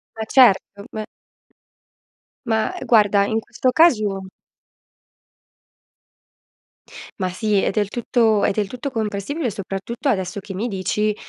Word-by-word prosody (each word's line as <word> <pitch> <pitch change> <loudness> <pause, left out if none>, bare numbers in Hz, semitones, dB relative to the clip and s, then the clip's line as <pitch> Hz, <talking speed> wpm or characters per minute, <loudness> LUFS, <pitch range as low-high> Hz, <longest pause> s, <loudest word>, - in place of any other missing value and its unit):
ma 220 - -4
certo, 205 -5 +3
beh. 215 -1 -5 1.4
Mah, 220 +9 0
guarda, 205 -3 +4
in 220 +2 0
questo 240 +3 -1
caso 215 - +3 2.9
Ma 185 -1 -1
sì, 210 +3 -1
è - - +1
del 205 0 -1
tutto 225 -2 +1
è - - +3
del 205 0 -1
tutto 250 +6 -6
compressibile, 225 - -2
soprattutto 195 +6 -5
adesso 190 -6 -1
che 195 0 -8
mi 205 +6 -2
dici 210 +1 -1
215 Hz, 115 wpm, -21 LUFS, 200-235 Hz, 2.9 s, guarda